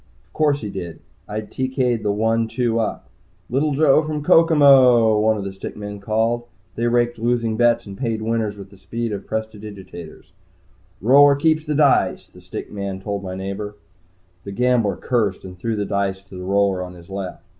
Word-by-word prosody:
Of -, -, -35 dB
course 145 Hz, -2 st, +1 dB
he 105 Hz, -3 st, -5 dB
did. 85 Hz, -4 st, -7 dB, 0.3 s
I 105 Hz, +1 st, -3 dB
TK'd 130 Hz, +1 st, -1 dB
the 105 Hz, -, 0 dB
one 115 Hz, +2 st, +1 dB
two 115 Hz, 0 st, 0 dB
up. 110 Hz, -, -3 dB, 0.4 s
"Little 140 Hz, +3 st, +1 dB
Joe 150 Hz, 0 st, +5 dB
from 150 Hz, -1 st, -4 dB
Kokomo," 135 Hz, -9 st, +6 dB
one 110 Hz, 0 st, +2 dB
of 100 Hz, -, -4 dB
the 95 Hz, 0 st, -5 dB
stick 95 Hz, -, -8 dB
men 105 Hz, -1 st, -7 dB
called. 115 Hz, +3 st, 0 dB, 0.3 s
They 115 Hz, +3 st, -1 dB
raked 120 Hz, -1 st, +1 dB
losing 115 Hz, -1 st, 0 dB
bets 120 Hz, 0 st, +2 dB
and 100 Hz, -1 st, -9 dB
paid 115 Hz, -2 st, -2 dB
winners 110 Hz, -2 st, -1 dB
with 100 Hz, -1 st, -11 dB
the 100 Hz, -, -17 dB
speed 115 Hz, +4 st, -4 dB
of 100 Hz, -2 st, -6 dB
prestidigitators. 105 Hz, -6 st, -7 dB, 0.7 s
"Roller 140 Hz, +6 st, +6 dB
keeps 155 Hz, +2 st, +1 dB
the 150 Hz, -1 st, -1 dB
dice," 140 Hz, -2 st, +2 dB
the -, -, -17 dB
stick -, -, -8 dB
man 100 Hz, -2 st, -5 dB
told 100 Hz, +1 st, -4 dB
my 95 Hz, -1 st, -6 dB
neighbor. 100 Hz, +2 st, -5 dB, 0.7 s
The 100 Hz, -, -7 dB
gambler 120 Hz, -2 st, +2 dB
cursed 110 Hz, -8 st, -1 dB
and 90 Hz, -1 st, -9 dB
threw 110 Hz, +5 st, -3 dB
the 105 Hz, -1 st, -2 dB
dice 100 Hz, -1 st, -2 dB
to 100 Hz, -1 st, -14 dB
the 90 Hz, 0 st, -7 dB
roller 100 Hz, -1 st, +1 dB
on 90 Hz, 0 st, -7 dB
his 85 Hz, -1 st, -14 dB
left. 95 Hz, -2 st, -6 dB
110 Hz, 190 wpm, -21 LUFS, 100-125 Hz, 0.7 s, Kokomo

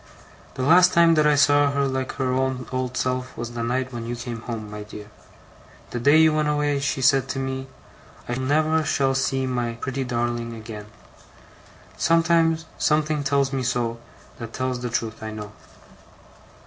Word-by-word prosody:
'The 130 Hz, -, -3 dB
last 180 Hz, +5 st, +6 dB
time 170 Hz, -1 st, +6 dB
that 155 Hz, -1 st, +4 dB
I 150 Hz, -, +4 dB
saw 145 Hz, 0 st, +4 dB
her 140 Hz, 0 st, 0 dB
like 130 Hz, -1 st, -3 dB
her 130 Hz, -2 st, -1 dB
own 130 Hz, -1 st, -1 dB
old 130 Hz, -1 st, -2 dB
self, 130 Hz, 0 st, -2 dB
was 120 Hz, 0 st, -5 dB
the 120 Hz, -, -4 dB
night 125 Hz, +2 st, -2 dB
when 115 Hz, -1 st, -5 dB
you 120 Hz, -, -3 dB
came 120 Hz, -1 st, -6 dB
home, 115 Hz, -3 st, -6 dB
my 105 Hz, 0 st, -7 dB
dear. 105 Hz, 0 st, -10 dB, 0.8 s
The 120 Hz, -, -3 dB
day 145 Hz, +6 st, +5 dB
you 160 Hz, -1 st, +5 dB
went 155 Hz, -1 st, +1 dB
away, 145 Hz, -1 st, +1 dB
she 140 Hz, -1 st, -1 dB
said 135 Hz, 0 st, +4 dB
to -, -, -3 dB
me, 130 Hz, 0 st, -3 dB, 0.6 s
"I 120 Hz, -, -2 dB
never 155 Hz, +5 st, +1 dB
shall 135 Hz, -2 st, +1 dB
see 135 Hz, 0 st, 0 dB
my 120 Hz, -2 st, -2 dB
pretty 130 Hz, +3 st, -4 dB
darling 120 Hz, -1 st, -2 dB
again. 110 Hz, -2 st, -9 dB, 1.1 s
Something 160 Hz, -2 st, +2 dB
tells 140 Hz, 0 st, +1 dB
me 135 Hz, -, -1 dB
so, 120 Hz, -2 st, -1 dB, 0.4 s
that 115 Hz, -1 st, -7 dB
tells 130 Hz, -1 st, -2 dB
the 125 Hz, -, -3 dB
truth, 115 Hz, -2 st, -3 dB
I 110 Hz, -, -5 dB
know." 105 Hz, -1 st, -7 dB
130 Hz, 175 wpm, -23 LUFS, 120-145 Hz, 1.1 s, last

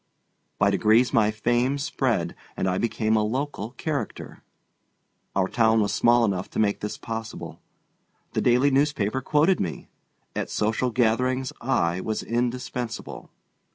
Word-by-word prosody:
By 100 Hz, -, +3 dB
degrees 110 Hz, +4 st, +3 dB
my 105 Hz, -2 st, +4 dB
fame 120 Hz, +5 st, +1 dB
spread, 120 Hz, -, -1 dB, 0.2 s
and -, -, 0 dB
I 90 Hz, 0 st, 0 dB
became 110 Hz, -1 st, 0 dB
a 110 Hz, -, +3 dB
local 125 Hz, -1 st, -3 dB
"character." 145 Hz, +2 st, -4 dB, 0.9 s
Our 95 Hz, -1 st, +2 dB
town 115 Hz, 0 st, +3 dB
was 105 Hz, -1 st, +1 dB
small 120 Hz, 0 st, +4 dB
enough 95 Hz, -3 st, -2 dB
to -, -, -4 dB
make 105 Hz, -2 st, +2 dB
this 105 Hz, -, -4 dB
possible. 115 Hz, -1 st, -6 dB, 0.7 s
The -, -, 0 dB
daily 125 Hz, +3 st, +4 dB
newspaper 130 Hz, -4 st, +1 dB
quoted 155 Hz, +7 st, +3 dB
me. 85 Hz, -4 st, -4 dB, 0.5 s
At -, -, -2 dB
social 110 Hz, +4 st, 0 dB
gatherings 125 Hz, +2 st, +1 dB
I 95 Hz, -8 st, +1 dB
was 110 Hz, -1 st, -2 dB
indispensable. 120 Hz, 0 st, -3 dB
115 Hz, 135 wpm, -25 LUFS, 105-130 Hz, 0.9 s, my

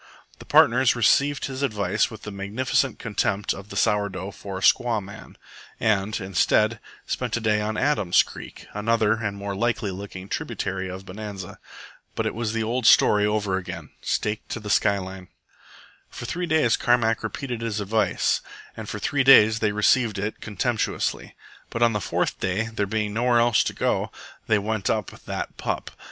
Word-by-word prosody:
The -, -, -11 dB
partners 125 Hz, +1 st, +5 dB
received 140 Hz, +4 st, +3 dB
his 135 Hz, 0 st, -5 dB
advice 105 Hz, -9 st, 0 dB
with 110 Hz, -2 st, -11 dB
the 105 Hz, -, -6 dB
magnificent 105 Hz, +5 st, -1 dB
contempt 105 Hz, -3 st, -1 dB
of 100 Hz, +1 st, -10 dB
the -, -, -8 dB
sour 100 Hz, +1 st, +2 dB
dough 95 Hz, +1 st, -6 dB
for 95 Hz, -1 st, -7 dB
a -, -, -6 dB
squaw 120 Hz, +2 st, +3 dB
man, 100 Hz, +2 st, -11 dB, 0.4 s
and, 105 Hz, -1 st, +1 dB
instead, 105 Hz, +3 st, +2 dB, 0.3 s
spent -, -, -3 dB
the -, -, +1 dB
day 105 Hz, -2 st, +1 dB
on 105 Hz, 0 st, -2 dB
Adam's 130 Hz, -11 st, +3 dB
Creek, -, -, -11 dB
another 110 Hz, +1 st, +1 dB
and 100 Hz, -2 st, -2 dB
more 100 Hz, 0 st, -4 dB
likely 110 Hz, -1 st, -1 dB
looking 95 Hz, 0 st, -8 dB
tributary 95 Hz, -1 st, -3 dB
of 95 Hz, +1 st, -8 dB
Bonanza. 100 Hz, -1 st, -8 dB, 0.6 s
But -, -, -1 dB
it -, -, -1 dB
was 115 Hz, -1 st, -2 dB
the 115 Hz, 0 st, -1 dB
old 120 Hz, +2 st, 0 dB
story 105 Hz, 0 st, +6 dB
over 105 Hz, -3 st, 0 dB
again 95 Hz, -, -7 dB
staked 105 Hz, 0 st, -2 dB
to -, -, -4 dB
the 105 Hz, -1 st, -5 dB
sky 100 Hz, -1 st, +3 dB
line. 95 Hz, -1 st, -7 dB, 0.8 s
For -, -, -8 dB
threes 175 Hz, +6 st, -3 dB
days 155 Hz, -7 st, +3 dB
Carmack 115 Hz, -2 st, +2 dB
repeated 125 Hz, -4 st, -4 dB
his 115 Hz, -2 st, -2 dB
advice, 105 Hz, 0 st, +1 dB, 0.3 s
and -, -, -7 dB
for -, -, -4 dB
three 145 Hz, -2 st, 0 dB
days 110 Hz, -5 st, +7 dB
they 110 Hz, -2 st, +1 dB
received 105 Hz, +1 st, +2 dB
it 100 Hz, +2 st, -4 dB
contemptuously. 110 Hz, +2 st, -2 dB, 0.3 s
But 115 Hz, -, 0 dB
on 115 Hz, -1 st, +4 dB
the 105 Hz, -, -1 dB
fourth -, -, -1 dB
day, 100 Hz, +5 st, -1 dB
there 105 Hz, -2 st, -1 dB
being 105 Hz, 0 st, -2 dB
nowhere 120 Hz, +2 st, +2 dB
else 115 Hz, -2 st, +4 dB
to -, -, -2 dB
go, -, -, -1 dB, 0.4 s
they 110 Hz, -, +4 dB
went 105 Hz, 0 st, -2 dB
up 110 Hz, -4 st, -1 dB
"that -, -, -5 dB
pup." -, -, -3 dB
105 Hz, 175 wpm, -24 LUFS, 100-115 Hz, 0.8 s, days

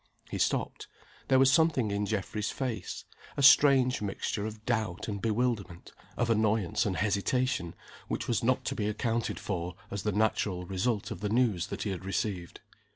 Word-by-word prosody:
He -, -, -3 dB
stopped. -, -, -1 dB, 0.4 s
There 130 Hz, -, +4 dB
was 135 Hz, 0 st, +6 dB
something 150 Hz, -8 st, +3 dB
in 100 Hz, 0 st, -1 dB
Geoffrey's 105 Hz, 0 st, -2 dB
face 130 Hz, -4 st, -4 dB, 0.3 s
a 140 Hz, -, 0 dB
strange 135 Hz, -3 st, +6 dB
mixture 100 Hz, +1 st, -2 dB
of 110 Hz, 0 st, -9 dB
doubt 110 Hz, -7 st, -1 dB
and 100 Hz, -2 st, -4 dB
bewilderment, 110 Hz, -6 st, -1 dB, 0.3 s
of 120 Hz, -1 st, +1 dB
annoyance 110 Hz, -3 st, +1 dB
and 95 Hz, -4 st, -1 dB
hesitation 100 Hz, 0 st, 0 dB, 0.3 s
which -, -, -3 dB
was -, -, 0 dB
not -, -, +1 dB
to -, -, -1 dB
be 105 Hz, -, -2 dB
accounted 115 Hz, +2 st, -1 dB
for 90 Hz, -2 st, -4 dB, 0.2 s
as 100 Hz, -, -3 dB
the 105 Hz, -, 0 dB
natural 105 Hz, -3 st, 0 dB
result 100 Hz, +4 st, -1 dB
of -, -, -5 dB
the 105 Hz, +1 st, -2 dB
news 110 Hz, -7 st, +1 dB
that -, -, -4 dB
he 105 Hz, -, -2 dB
had 95 Hz, -1 st, -5 dB
received. 95 Hz, -2 st, -3 dB
105 Hz, 170 wpm, -30 LUFS, 95-120 Hz, 0.4 s, was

